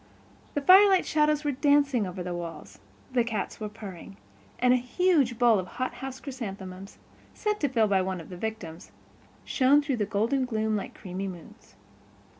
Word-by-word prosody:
The 290 - 0
firelight 380 +3 +6
shadows 300 -1 +2
were 295 - 0
dancing 280 -5 +2
over 180 0 -6
the 180 0 -4
walls; 165 - -8 0.3
the 245 -2 +3
cats 225 -3 -4
were 215 -1 -4
purring; 195 - -10 0.4
and 250 0 +4
a - - +4
huge 265 -1 +1
bowl 235 -4 +4
of 185 - -5
hothouse 260 +1 -4
chrysanthemums, 195 -7 -8 0.4
sent 420 0 -1
to 290 - 0
Phil 230 -4 +2
by 195 -2 +2
one 185 -1 -3
of 165 - -11
the 180 - -8
victims, 185 -5 -6 0.5
shone 275 +2 +4
through 285 -3 -1
the 210 -2 -1
golden 230 +6 0
gloom 220 -3 -1
like 200 - -5
creamy 190 +1 -5
moons. 175 - -12
225 Hz, 170 wpm, -27 LUFS, 190-275 Hz, 0.5 s, firelight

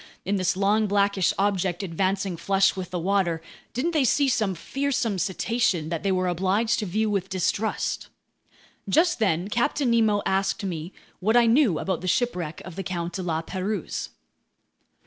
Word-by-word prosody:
In 200 +2 0
this 185 -1 0
long, 210 +2 +2
blackish 200 -2 +2
object 195 -2 0
advancing 190 +1 -1
flush 195 +3 +2
with 185 -2 -5
the 180 - -3
water, 180 -2 +1 0.3
didn't 265 +8 -1
they 310 -4 +2
see 280 +3 +3
some 215 -7 +1
fearsome 250 - -1
cetacean 185 -2 0
that 165 -1 -2
they 195 - 0
were 185 -1 +1
obliged 195 +7 +1
to 210 - -3
view 215 +5 0
with 195 -2 -1
distrust? 190 +3 -1 0.8
Just 345 0 +3
then 175 -4 +1
Captain 240 +4 +1
Nemo 220 -3 +3
asked 195 +1 0
me 170 -2 -4 0.3
what 220 +5 +3
I 240 - +6
knew 230 - +4
about 190 -1 -2
the 185 - -5
shipwreck 180 -6 -1
of 185 -1 -9
the 195 - -3
Count 175 -1 -4
de 185 - -3
La 165 -2 -2
Pérouse. 190 +4 -3
195 Hz, 165 wpm, -25 LUFS, 180-220 Hz, 0.8 s, I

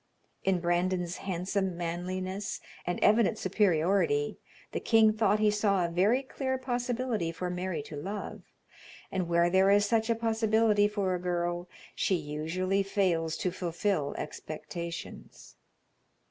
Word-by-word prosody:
In 190 -2 +2
Brandon's 175 0 0
handsome 190 0 -2
manliness 185 +3 -3 0.3
and 175 - -1
evident 215 0 +4
superiority, 200 - +1 0.3
the - - -2
king 220 -2 +4
thought 215 -1 +2
he 215 0 +3
saw 200 -3 +2
a 170 - -3
very 205 +10 +3
clear 260 0 -2
possibility 245 -7 -1
for 180 +1 -4
Mary 180 -4 -3
to 150 - -9
love, 195 +8 -5 0.7
and 185 -3 -2
where 170 0 +3
there 190 +1 +5
is 205 +1 +5
such 225 0 +1
a 230 - +3
possibility 220 -2 +3
for 200 -3 -1
a 180 - -1
girl, 175 0 -2 0.2
she 190 - +1
usually 165 +5 -1
fails 180 -5 0
to 180 - -1
fulfill 175 -3 -1
expectations. 170 +2 -7
190 Hz, 130 wpm, -30 LUFS, 175-210 Hz, 0.7 s, there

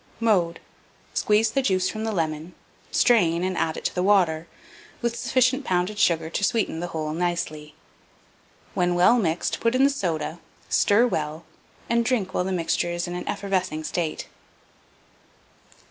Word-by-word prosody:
Mode. 185 -7 +2 0.5
Squeeze 215 +1 +2
the 270 - +1
juice 185 -7 +1
from 215 +3 -4
the 220 - -1
lemon; 160 -2 -3 0.3
strain, 175 -8 +3
and 185 0 -1
add 160 -2 -1
it - - -8
to - - 0
the 180 - -1
water, 175 -5 +2 0.5
with 235 -1 -1
sufficient 255 +3 +1
pounded 185 0 -1
sugar 165 -5 +2
to 165 +5 -3
sweeten 215 -7 0
the 175 - -3
whole 155 -2 -3
nicely. 155 -3 -3 1.0
When 180 -2 +1
well 185 +8 +5
mixed, 170 -4 -1
put 230 +1 +1
in 260 - +4
the 280 - +5
soda, 170 - -3 0.3
stir 210 +4 +4
well, 155 -7 -2 0.4
and 235 0 +2
drink 225 -6 -1
while 180 - 0
the 190 - -2
mixture 175 -1 0
is 175 +1 -2
in 175 - -5
an 180 - -5
effervescing 185 -5 -2
state. 160 0 -3
180 Hz, 160 wpm, -24 LUFS, 165-220 Hz, 1.0 s, well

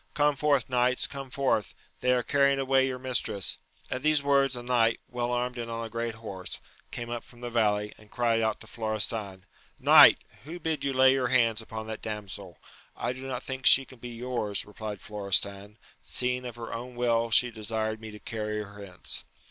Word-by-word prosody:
Come 145 -1 +3
forth, 140 -3 +2
knights, 125 0 +2
come 135 -1 -6
forth! 130 -6 0 0.2
they 125 - +2
are 125 -1 +2
carrying 140 0 +3
away 135 0 +3
your 130 -1 -3
mistress! 125 -6 -1 0.3
At 130 - -2
these 150 -1 +3
words 140 -2 +3
a 120 - -6
knight, 120 -2 +2
well 125 -1 -2
armed 125 0 -1
and 115 0 -4
on 115 0 -4
a 110 - -9
great 115 -1 -3
horse, 100 -5 -4 0.3
came 120 -1 -6
up 120 -1 -4
from 120 -1 -18
the 120 -1 -5
valley, 105 -2 +1
and 105 -1 -18
cried 115 -1 +1
out 110 -1 0
to - - -8
Florestan, 110 -3 -2 0.3
Knight! - - +8 0.3
who 165 +5 -8
bid 155 -3 -2
you 140 - 0
lay 130 0 +6
your 130 -1 +1
hands 115 -3 +3
upon 110 0 -7
that 110 0 -6
damsel 105 -3 -6 0.2
% - - -28
I 125 - -1
do 130 +1 -8
not 125 -2 -4
think 130 0 -1
she 135 - +8
can 130 -1 -16
be 120 0 -8
yours^ 120 -5 -2
replied 105 -1 -7
Florestan, 100 0 -1 0.2
seeing 125 0 0
of 120 -2 -6
her 115 -1 -7
own 120 +2 -6
will 115 -1 +1
she 120 +1 +4
desired 110 0 -3
me 110 - -7
to 105 - -10
carry 105 -1 -3
her 105 0 -11
hence. 90 -2 -5
120 Hz, 205 wpm, -28 LUFS, 110-130 Hz, 0.3 s, Knight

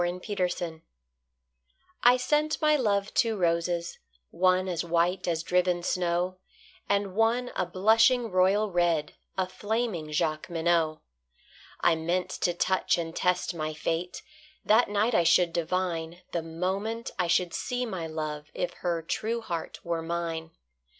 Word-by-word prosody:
The 175 - +1
White 180 -1 -2
Flag 165 -2 -5 1.2
I 245 +1 +6
sent 300 +4 +1
my 305 -1 +4
love 205 -7 0
two 225 -2 +2
roses, 170 -1 0 0.3
one 185 +1 +2
As 175 -2 -1
white 175 +2 +1
as 165 -1 0
driven 180 0 +1
snow, 180 +1 0 0.5
And 200 -1 +1
one 230 +4 +1
a - - 0
blushing 225 +6 +3
royal 195 +3 +3
red, 170 -4 +1 0.2
A 190 -1 +1
flaming 205 -5 -2
Jacqueminot. 160 +1 0 0.8
I 170 - +5
meant 170 +3 -1
to 175 - 0
touch 185 +1 +1
and 165 -1 -4
test 180 0 +1
my 155 -2 -3
fate; 165 +3 -3 0.4
That 220 +2 +4
night 210 +4 +1
I 175 - +4
should 170 0 +4
divine, 170 0 -2
The 170 - -1
moment 190 +8 -3
I 180 - +2
should 170 0 +2
see 250 0 -2
my 185 -8 -4
love, 155 -2 -4
If - - -2
her 170 -2 -1
true 225 +8 -2
heart 170 -7 -5
were 170 -1 -1
mine. 165 -1 -3
180 Hz, 145 wpm, -28 LUFS, 165-200 Hz, 1.2 s, I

